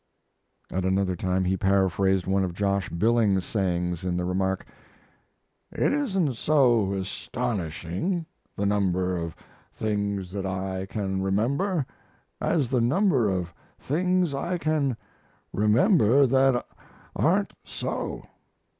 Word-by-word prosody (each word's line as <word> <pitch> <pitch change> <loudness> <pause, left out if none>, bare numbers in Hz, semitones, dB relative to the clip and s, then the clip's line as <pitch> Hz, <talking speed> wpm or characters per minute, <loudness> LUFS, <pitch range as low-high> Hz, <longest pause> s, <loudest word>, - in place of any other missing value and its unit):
At 95 +1 -1
another 95 0 +1
time 95 +2 0
he 95 +1 +1
paraphrased 95 -1 +2
one 95 0 +1
of 90 -2 -3
Josh 100 -1 0
Billings's 105 0 +2
sayings 90 -4 -1
in 90 -1 -1
the 90 - -1
remark: 95 +1 -1 1.1
"It - - +1
isn't 195 - 0
so 120 -7 +3
astonishing, 100 - -3 0.3
the 100 - -1
number 95 -3 +1
of 85 -1 -4 0.4
things 100 -3 -2
that 95 -1 -3
I 95 0 -3
can 95 -2 -2
remember, 135 - 0 0.6
as 150 -7 +1
the 125 -2 +2
number 135 - +3
of 90 -3 -2 0.2
things 180 +2 0
I 170 +6 -2
can 150 -7 0 0.6
remember 125 - +4
that 130 -1 +3 0.5
aren't - - +2
so." - - -4
100 Hz, 115 wpm, -26 LUFS, 95-135 Hz, 1.1 s, remember